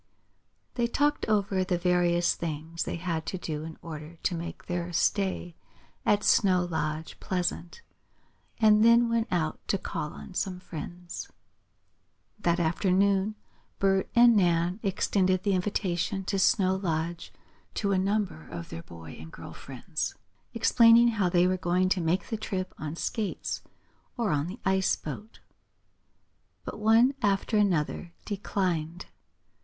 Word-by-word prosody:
They 240 -1 +1
talked 290 +4 +1
over 200 -3 +1
the 180 -1 0
various 175 -1 +2
things 160 +1 -4
they - - -3
had 165 -2 -2
to 185 - -2
do 155 -4 -4
in 160 0 -8
order 155 0 -8
to 185 - +1
make 170 0 -6
their 175 0 -3
stay 185 0 0 0.5
at 205 0 +3
Snow 185 -3 +4
Lodge 160 -2 -3
pleasant, 180 - -3 0.7
and 215 -1 +5
then 235 +1 +6
went 230 -1 +1
out 165 -4 -1
to 195 - +1
call 150 -4 -4
on - - -10
some 180 0 -2
friends. 175 +1 -7 1.1
That 175 -3 +1
afternoon 190 +4 +2 0.4
Bert 195 -1 +2
and 235 -1 +7
Nan 175 0 +2
extended 185 -2 +1
the 200 - +2
invitation 190 0 -1
to 195 +1 -1
Snow 190 0 +3
Lodge 170 -2 -3 0.4
to 200 -2 0
a 190 - +2
number 195 - -1
of 85 -1 -7
their 80 - -6
boy 80 -2 -11
and 80 +1 -10
girl - - -10
friends, - - -5 0.4
explaining 230 +1 +6
how 210 -6 +1
they 175 0 +4
were 185 0 +2
going 180 +1 +1
to 185 -1 +1
make 170 +3 0
the 225 - -2
trip 185 -3 -4
on 155 0 -4
skates 210 +3 -3 0.6
or 230 -5 0
on 145 +1 0
the 195 +7 -7
ice 190 0 +2
boat. 210 - -8 1.2
But - - -6
one 225 +5 +5
after 205 +1 +1
another 175 -4 +1
declined. 180 -5 -2
185 Hz, 140 wpm, -28 LUFS, 170-205 Hz, 1.2 s, and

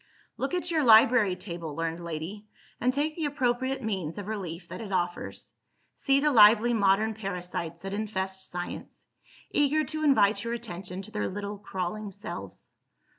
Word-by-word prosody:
Look 275 +7 -2
at 355 -1 -2
your 315 -3 +2
library 220 -4 +6
table, 170 -5 -6
learned 165 +1 -3
lady, 170 +6 -6 0.3
and 250 +2 +2
take 295 +3 -1
the 325 - -2
appropriate 260 -2 0
means 190 -7 -3
of 205 - -5
relief 180 -5 -5
that 180 +4 -6
it 210 -3 -7
offers. 175 -2 -3 0.4
See 275 -1 +2
the 300 +1 +3
lively 225 0 +7
modern 210 +1 +3
parasites 180 -5 -5
that 195 0 -4
infest 190 -3 -3
Science, 175 0 -6 0.5
eager 295 +2 +3
to 310 0 -4
invite 225 -8 +4
your 230 0 -2
attention 190 -5 -6
to 215 - -11
their 210 -1 -2
little 205 +1 -5
crawling 205 +1 -4
selves. 200 +2 -8
210 Hz, 160 wpm, -28 LUFS, 180-240 Hz, 0.5 s, lively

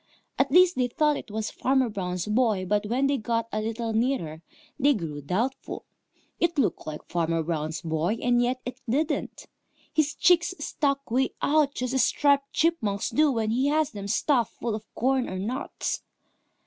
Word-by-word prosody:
At 270 0 +3
least, 360 +3 +6
they 250 -1 +2
thought 300 +4 +2
it - - -7
was 215 +1 -3
Farmer 265 -1 +1
Brown's 180 -5 -3
boy, 215 -3 +1
but 205 +2 0
when 250 +5 +1
they 280 0 +2
got 230 +1 -1
a 215 - -1
little 225 +1 -3
nearer, 220 - -1 0.4
they 285 0 +4
grew 155 -7 -5
doubtful. 215 - -3 0.5
It 345 -1 +1
looked 220 -10 0
like 150 -1 -7
Farmer 165 -1 0
Brown's 155 0 -3
boy, 165 +5 0
and 245 0 +2
yet 250 +1 0
it 255 +2 -6
didn't. 290 +6 -1 0.5
His 305 -1 +1
cheeks 355 +1 +3
stuck 275 -3 -1
way 260 +3 +1
out 295 -1 +2
just 250 0 -2
as 265 -3 +4
Striped 280 0 +2
Chipmunk's 225 -12 0
do 300 -1 +4
when 225 -3 0
he 255 +4 +2
has 305 0 +2
them 200 -3 -6
stuffed 240 +2 +1
full 235 - -2
of 215 0 -7
corn 260 +1 +1
or 185 - -4
nuts. 235 +8 -3
240 Hz, 175 wpm, -26 LUFS, 205-275 Hz, 0.5 s, least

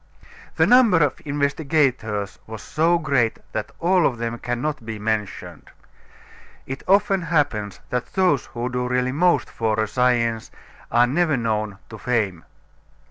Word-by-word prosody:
The - - +4
number 245 -7 +6
of 145 - -1
investigators 140 - 0
was 110 -1 -8
so 165 +3 +2
great 140 -8 +1
that 110 -1 -3
all 180 0 +3
of 125 - -3
them 115 0 -4
cannot 125 +3 -3
be 110 -1 -6
mentioned. 105 -1 -4 1.0
It 135 +1 -6
often 195 -1 +3
happens 140 - -1
that 125 -1 -3
those 180 -9 +2
who 120 -1 -4
do 125 0 -2
really 125 0 0
most 175 +6 +2
for 110 -1 -1
a 110 - +1
science 115 -1 +1 0.4
are 120 +1 +5
never 155 +2 +1
known 110 -3 -2
to 110 - -10
fame. 105 -9 -1
125 Hz, 140 wpm, -22 LUFS, 110-150 Hz, 1.0 s, number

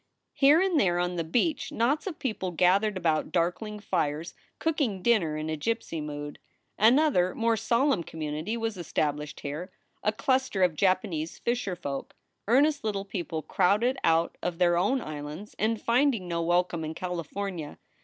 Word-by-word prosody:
Here 290 +3 +6
and 370 -4 +2
there 175 -6 +2
on 180 0 0
the 170 - -1
beach 245 - 0
knots 275 - +1
of 350 - -4
people 215 -7 -2
gathered 185 +4 +2
about 160 -4 0
darkling 195 +5 -1
fires, 165 -5 -2 0.2
cooking 275 - -1
dinner 180 -11 +2
in 155 0 -3
a 160 - -1
gypsy 170 -1 -2
mood. 145 0 -6 0.4
Another, 225 - +4
more 230 0 +2
solemn 235 +1 +2
community 160 +6 -4
was 225 -3 -3
established 150 -3 -2
here: 155 +6 -5 0.3
a 210 - +2
cluster 260 -3 +1
of 180 -3 +3
Japanese 170 -2 0
fisherf 200 -7 -2
oik 140 -1 -4 0.3
earnest 285 +5 +3
little 200 -2 -2
people 170 -5 -4
crowded 210 - +2
out 165 +1 +2
of 175 -1 -2
their 175 -1 +3
own 205 +10 +2
islands 150 +5 -7
and 220 +1 +1
finding 235 -5 +2
no 170 -1 -1
welcome 175 0 +1
in 155 +1 -5
Cali 180 0 -3
fornia. 180 -3 -5
185 Hz, 160 wpm, -28 LUFS, 165-230 Hz, 0.4 s, Here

